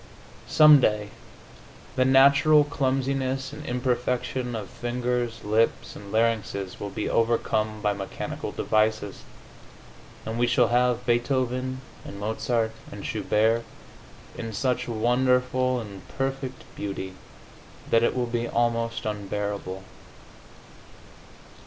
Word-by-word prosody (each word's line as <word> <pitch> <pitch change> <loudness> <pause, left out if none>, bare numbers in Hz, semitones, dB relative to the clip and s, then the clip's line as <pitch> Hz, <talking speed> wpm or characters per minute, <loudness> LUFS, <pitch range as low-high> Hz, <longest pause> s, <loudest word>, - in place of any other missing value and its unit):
Some 150 -1 +8
day 105 -3 +1 0.9
the 130 - +3
natural 140 +3 +6
clumsiness 135 -1 -1
and 150 +1 -8
imperfection 125 0 -1
of 105 -3 -5
fingers, 120 0 -2
lips 110 +2 +1
and 100 -1 -10
larynxes 110 -4 0
will 100 - -4
be 105 - -3
overcome 110 -2 0
by 105 -1 +2
mechanical 100 -1 -5
devices, 110 -2 0 1.0
and 110 +1 -3
we 120 - +3
shall 120 -1 +3
have 125 0 +2
Beethoven 130 +1 0 0.2
and 100 - -9
Mozart 110 +2 -1 0.2
and - - -8
Schubert 110 +2 +1 0.7
in 115 -1 -5
such 125 +4 0
wonderful 125 +2 +2
and 100 -4 -8 0.2
perfect 135 -1 -3
beauty 95 -2 -5 0.8
that 115 - +5
it 120 - +2
will 125 -1 0
be 120 0 -2
almost 115 -1 0
unbearable. 100 -2 -3
120 Hz, 110 wpm, -26 LUFS, 110-130 Hz, 1.0 s, Some